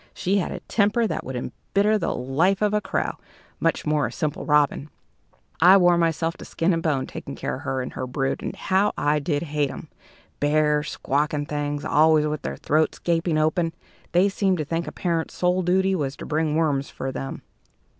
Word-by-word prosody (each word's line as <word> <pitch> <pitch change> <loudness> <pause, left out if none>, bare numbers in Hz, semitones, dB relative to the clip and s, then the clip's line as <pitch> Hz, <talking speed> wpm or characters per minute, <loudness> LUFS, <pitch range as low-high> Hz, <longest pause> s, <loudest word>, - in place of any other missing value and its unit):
She 195 +3 +1
had 180 - -2
a - - -6
temper 215 +2 +1
that - - -2
would 130 - -6
embitter 205 - 0
the - - -1
life 165 +11 +1
of 210 0 +2
a 210 - +2
crow, - - -2 0.4
much - - 0
more 150 -4 +1
a - - -7
simple 150 +3 -3
robin. 150 -1 +2 0.7
I 185 +2 +8
wore 175 -2 +5
myself 165 0 0
to - - -10
skin 170 +3 0
and 165 - 0
bone 145 -5 0
taking - - -8
care - - -3
of - - -10
her 130 -1 -2
and 125 - -7
her 130 - -4
brood, 135 +1 -2
and - - -4
how 195 +2 +1
I 150 +1 +2
did 145 0 -1
hate 150 -3 -1
'em! - - -9 0.5
bare, 150 0 +2
squawking 150 0 -1
things, 145 0 -3
always 155 0 +4
with 150 -1 -2
their 70 0 -4
throats 155 +1 +1
gaping 165 -1 0
open. 165 +2 +1 0.4
They 180 +3 +4
seemed 195 -2 +1
to 155 - -2
think 165 +2 -2
a - - -4
parent's 165 -2 -2
sole 180 +1 +1
duty 190 +2 +2
was 145 -6 -2
to - - -8
bring 155 0 0
worms 145 -4 +1
for 130 - -5
them." 135 +1 -6
155 Hz, 200 wpm, -24 LUFS, 145-180 Hz, 0.7 s, I